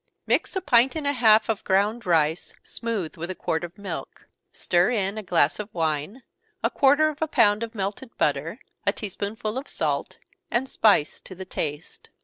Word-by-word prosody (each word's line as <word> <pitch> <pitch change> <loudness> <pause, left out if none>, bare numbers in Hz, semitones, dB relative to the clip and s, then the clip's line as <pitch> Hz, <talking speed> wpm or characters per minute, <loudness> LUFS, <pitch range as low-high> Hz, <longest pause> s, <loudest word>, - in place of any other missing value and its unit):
_ - - -58 0.2
Mix - - 0
a 380 - 0
pint 260 -4 +4
and 310 -2 -3
a 285 - +2
half 220 -4 +5
of 220 -3 -1
ground 205 +3 +1
rice, 160 -1 +1
smooth, 210 -8 -4
with 170 +2 -5
a 185 - -4
quart 160 -1 -2
of 175 +1 -8
milk 195 -5 -7 0.2
stir 175 +1 +2
in 200 -4 0
a 215 - -4
glass 170 -5 +2
of 210 0 -6
wine, 160 - -2 0.4
a - - +2
quarter 290 +3 +4
of 305 0 -9
a 315 - +1
pound 215 -7 +3
of 230 0 -5
melted 205 +5 -5
butter, - - 0 0.3
a - - +2
tea 210 - -6
spoonful 215 +4 -4
of 280 - -10
salt, - - -2 0.3
and 250 +3 0
spice 205 - +3
to 185 - -11
the 190 +1 -8
taste. 150 -3 -5
210 Hz, 195 wpm, -25 LUFS, 175-240 Hz, 0.4 s, half